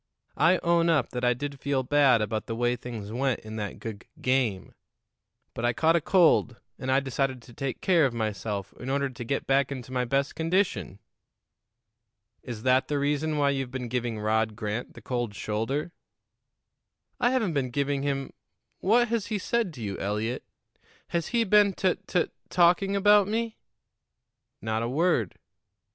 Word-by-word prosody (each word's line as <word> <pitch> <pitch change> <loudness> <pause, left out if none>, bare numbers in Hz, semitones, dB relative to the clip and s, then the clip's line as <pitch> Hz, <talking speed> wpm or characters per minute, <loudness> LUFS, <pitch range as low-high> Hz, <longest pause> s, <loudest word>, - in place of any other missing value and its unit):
"I 175 +3 +5
own 170 0 +3
up 150 -7 +2
that 125 - -4
I 125 0 +3
did 140 +2 -5
feel 140 -1 0
bad 135 -4 +4
about 110 +1 -3
the 115 - -3
way 120 +1 +1
things 115 -4 -7
went 130 +1 0
in 110 0 -8
that 105 -2 -4
gug 110 -3 -7 0.2
game; 125 -7 0 0.8
but 115 - -5
I 120 0 +2
caught 165 +4 +3
a 170 - +3
cold, 160 -9 +3 0.2
and 130 - -2
I 135 - +5
decided 135 -1 -1
to 120 - -15
take 135 +1 -4
care 170 -6 +4
of - - -5
myself 105 -3 -3
in 125 - -6
order 140 0 0
to 120 -1 -7
get 135 +4 -2
back 135 0 +2
into 130 -2 -6
my 125 -1 0
best 135 +3 0
condition." 165 - 0 1.4
"Is 115 -3 -7
that 130 0 +3
the 145 - -1
reason 150 +2 0
why 140 -1 +3
you've 135 -2 -2
been 125 -1 -5
giving 120 -2 -2
Rod 110 0 0
Grant 110 +1 -4
the - - -12
cold 120 -4 -2
shoulder?" 115 +12 -2 1.3
"I 240 - +3
haven't 235 -9 +1
been 135 -3 0
giving 140 +2 -1
him 135 -1 -2 0.5
What 235 +4 +3
has 230 -3 -1
he 215 - -1
said 225 0 0
to 120 - -7
you, 100 -2 -4
Eliot? 105 +5 -2 0.7
Has 170 -1 -1
he 235 -1 +2
been 205 -1 +4
tut 185 0 -1
tut 180 -3 0 0.2
talking 180 +3 +3
about 205 0 +5
me?" 225 +1 -2 1.0
"Not 110 0 -1
a 115 - -1
word." 140 - +1
135 Hz, 175 wpm, -27 LUFS, 115-165 Hz, 1.4 s, I